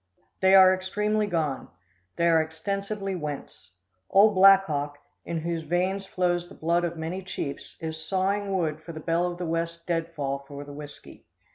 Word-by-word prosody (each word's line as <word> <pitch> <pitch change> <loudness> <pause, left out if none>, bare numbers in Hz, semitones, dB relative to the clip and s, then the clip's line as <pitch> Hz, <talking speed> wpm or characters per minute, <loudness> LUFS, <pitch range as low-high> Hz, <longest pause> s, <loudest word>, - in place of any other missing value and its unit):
They 190 0 +5
are 185 -1 +8
extremely 210 +3 0
gone. 160 -7 -1 0.5
They 170 - +1
are 165 -1 +5
extensively 195 +5 -3
whence. 150 - -7 0.4
Ole 205 +2 +6
Blackhawk, 185 -7 +5 0.3
in 165 -1 -3
whose 170 0 -2
veins 185 +5 -1
flows 175 -1 0
the - - -13
blood 170 +2 +1
of 170 -1 -2
many 165 +4 -4
chiefs, 140 -6 -6
is 160 0 -5
sawing 195 +4 0
wood 155 -3 -1
for 165 +1 -9
the 155 - -7
Belle 170 +2 0
of 175 - -8
the 180 - -4
West 165 0 -3
deadfall 165 -5 -2
for 145 0 -8
the 145 0 -10
whiskey. 145 0 -11
170 Hz, 165 wpm, -26 LUFS, 160-190 Hz, 0.5 s, are